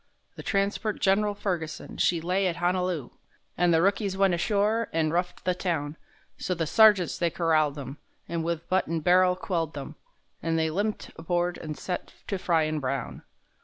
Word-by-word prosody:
The - - -8
transport 200 +1 -1
Gen'ral 205 +1 +2
Ferguson, 175 -6 -4
she 170 -2 +2
lay 185 +3 +1
at 175 - -1
Honolu', 175 -5 -1 0.4
An' 175 0 +2
the 165 0 +4
rookies 195 0 +1
went 195 -2 +3
ashore 210 +6 +1
an' 160 -1 +1
roughed 175 +1 -2
the 180 - +2
town, 165 -5 -2 0.4
So 180 - -1
the 165 -1 -1
sergeants 205 0 +5
they 170 - +2
corralled 155 -4 +1
them, 140 0 -7 0.3
and 170 -1 -2
with 170 0 -3
butt 190 +1 +1
and 165 -1 -2
barrel 180 +1 +5
quelled 170 -4 -2
them,— 145 +1 -6 0.5
An' 165 0 0
they 160 -1 +1
limped 205 +5 -2
aboard 175 +2 -1
an' 155 -2 -5
set 180 +3 -5
to 195 - -1
fryin' 160 -4 +1
brown. 135 -2 -3
175 Hz, 170 wpm, -27 LUFS, 160-190 Hz, 0.5 s, sergeants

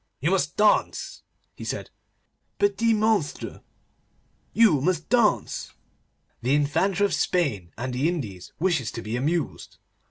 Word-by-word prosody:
'You 160 +7 +1
must 150 -7 0
dance,' 210 0 +2 0.3
he - - -9
said, - - -4 0.7
'petit 230 - +2
monsire. 215 -7 0 0.9
You 205 - +4
must 165 +1 0
dance. 235 -4 +1 0.7
The 130 +4 +2
Infanta 180 +7 +2
of 200 - -1
Spain 120 - 0
and 125 +2 -3
the 135 +6 +1
Indies 110 - -5
wishes 165 -9 +1
to 115 - -6
be 110 +2 -3
amused. 155 +6 -2
160 Hz, 125 wpm, -25 LUFS, 130-200 Hz, 0.9 s, You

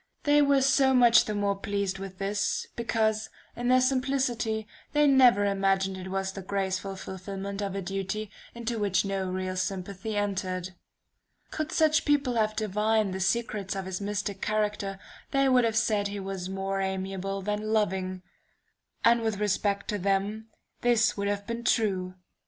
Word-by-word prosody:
They 295 0 +5
were 280 -2 +4
so 265 0 +4
much 240 -2 +6
the 210 - -3
more 200 -1 +1
pleased 200 -1 -2
with 190 -1 -7
this, 200 +1 -1
because, 220 -2 0 0.3
in 240 0 -3
their 255 +1 +5
simplicity, 255 -4 0 0.3
they 295 0 +4
never 255 -7 +6
imagined 195 -1 +1
it 185 0 -7
was 190 0 -2
the 195 - -7
graceful 195 0 -2
fulfillment 195 +1 -6
of 195 -1 -3
a 195 - -3
duty 195 +3 -3 0.2
into 235 -1 -3
which 200 -1 +1
no 195 -1 -2
real 185 0 -3
sympathy 195 +3 -3
entered. 185 -3 -2 0.8
"Could 310 0 -3
such 315 0 +3
people 285 -4 +2
have 215 -2 +1
divined 215 -1 +1
the 190 - -4
secrets 200 -1 -1
of 195 -1 -4
his 190 +1 -4
mystic 200 -1 -3
character, 210 -2 -1 0.3
they 275 0 +2
would 250 -2 +4
have 225 -1 0
said 210 -3 +2
he 200 0 -5
was 190 -1 -5
more 195 0 -2
amiable 190 0 -3
than 210 +2 -2
loving 190 -3 0 0.8
and 235 0 +5
with 220 -2 -1
respect 205 0 0
to 210 -2 -1
them, 200 +3 -1 0.3
this 235 -2 +3
would 200 -1 -2
have 200 0 -2
been 235 +1 -4
true. 190 -6 +1
205 Hz, 165 wpm, -28 LUFS, 195-230 Hz, 0.8 s, much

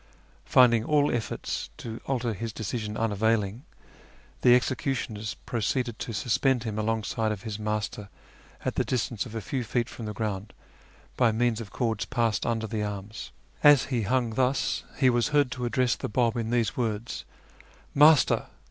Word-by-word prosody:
Finding 120 -3 +5
all 145 +2 +3
efforts 120 -2 -3
to 115 0 -7
alter 120 -4 0
his 115 +3 -4
decision 110 0 -4
unavailing, 110 +2 0 0.8
the 125 -1 +7
executioners 120 -4 -1
proceeded 120 +1 -1
to - - -4
suspend 125 +3 +1
him 110 -2 -3
alongside 110 0 -1
of 100 -3 -5
his 110 -2 -5
Master 105 -1 -3 0.6
at - - 0
the - - +1
distance 120 -2 -2
of 115 - -10
a 110 - -2
few 125 +5 -3
feet 120 +1 -1
from 115 -3 -7
the 105 - -4
ground 105 -1 -4 0.6
by 120 -3 +4
means 115 0 +1
of 110 - -8
cords 115 -4 -1
passed 115 -4 0
under 115 -1 0
the 110 -1 -3
arms. 105 +1 -5 0.3
As 145 -3 +8
he 120 - +1
hung 120 +2 +1
thus 130 +3 +1
he 130 -2 +4
was 120 -1 +2
heard 145 -3 +2
to 125 0 -3
address 125 0 +1
the - - -5
Bab 115 +1 +1
in 115 -2 -2
these 120 -2 +1
words: 115 -2 -2 0.4
" - - -21 0.3
Master 150 0 +5
115 Hz, 165 wpm, -27 LUFS, 110-125 Hz, 0.8 s, As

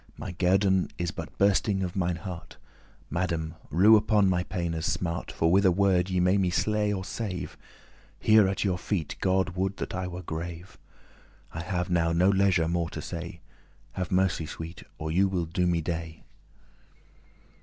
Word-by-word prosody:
My - - -6
guerdon* 95 +1 +2
is 85 -1 -2
but - - -8
bursting 100 0 +2
of 90 -2 -4
mine 90 -2 0
heart. 85 0 -8
*reward - - -30
Madame, 85 -3 -2 0.2
rue 95 +9 +6
upon 105 -2 +3
my 90 -1 +2
paine's 85 -3 -3
smart, 85 -2 -2
For 80 0 +1
with 95 +2 +4
a 95 - +5
word 95 -1 +2
ye 90 -1 0
may 90 +3 +3
me 95 -2 +2
slay 105 +3 +1
or 95 -2 -3
save. 95 -5 -5 0.6
Here 110 -2 +5
at 95 - -1
your 95 -3 0
feet 90 -7 -2
God 95 0 +2
would 95 +2 -2
that - - -5
I 95 0 -3
were 90 0 -7
grave. 85 +3 -7 0.7
I 80 - -4
have 90 0 -2
now 85 -1 +2
no 90 +3 +4
leisure 95 -4 +3
more 85 0 -1
to - - -7
say: - - -6 0.5
Have 90 -2 -4
mercy, 90 -4 +1
sweet, 80 +2 -8 0.2
or 80 0 -4
you 95 +4 +3
will 90 -3 -1
*do 90 +2 0
me 85 -1 +1
dey." 80 -1 -5
90 Hz, 175 wpm, -27 LUFS, 85-95 Hz, 0.7 s, rue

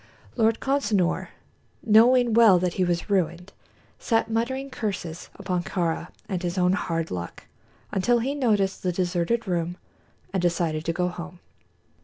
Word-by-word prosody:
Lord 225 -1 +2
Consinor, 210 -10 0 0.6
knowing 235 +2 +5
well 220 -5 +7
that 180 0 0
he 185 - 0
was 175 -1 -1
ruined, 180 -1 -1 0.5
sat 225 -1 0
muttering 260 +4 -2
curses 180 -8 -4
upon 185 -3 -2
Kāra 170 -2 -2 0.2
and 185 -3 -3
his 175 0 -3
own 180 0 +3
"hard 165 -4 -2
luck" 85 -1 -6 0.5
until 240 +6 +2
he 255 +4 -1
noticed 210 -9 +1
the 180 - 0
deserted 180 +5 -1
room 175 -1 -1 0.6
and 190 - 0
decided 165 -3 0
to 165 - +1
go 180 +1 0
home. 180 0 -7
185 Hz, 145 wpm, -25 LUFS, 175-225 Hz, 0.6 s, well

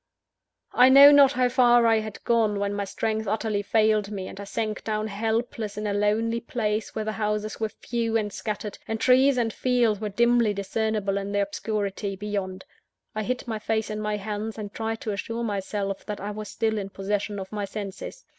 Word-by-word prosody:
I 250 +1 +7
know 280 +2 +10
not 280 -1 +7
how 255 -1 +2
far 240 -1 +5
I 225 -1 +4
had 215 -1 -7
gone, 225 -3 +2
when 200 0 -1
my 205 0 -2
strength 220 +2 -2
utterly 215 0 -1
failed 215 -1 +2
me, 195 -3 -5
and - - -9
I 200 - -6
sank 215 +1 -3
down 215 -1 -1
helpless, 220 0 -2
in 210 - -3
a 205 - 0
lonely 215 +3 +1
place 220 -3 -2
where 220 -1 -2
the 215 - -1
houses 210 0 -2
were 220 -1 -1
few 230 +1 -2
and 210 -2 -2
scattered, 210 -1 -5
and 225 0 -2
trees 260 +2 +4
and 230 -3 0
fields 240 -5 +1
were 210 - -2
dimly 235 0 +3
discernible 200 0 -1
in 200 0 -5
the 205 - +2
obscurity 200 -1 -3
beyond. 190 -2 -4 0.5
I 215 - -2
hid 250 +4 -3
my 220 -2 -3
face 220 0 -1
in 215 0 -3
my 210 0 -1
hands, 210 +2 -4
and 205 -2 -6
tried 225 0 -3
to 215 - -3
assure 230 +3 -4
myself 200 -2 -3
that 210 - -4
I 205 +2 -4
was 210 0 -6
still 220 -1 -1
in 195 -1 -5
possession 205 +1 -2
of 190 -1 -7
my 205 -1 -3
senses. 205 - -7
215 Hz, 200 wpm, -25 LUFS, 205-225 Hz, 0.5 s, know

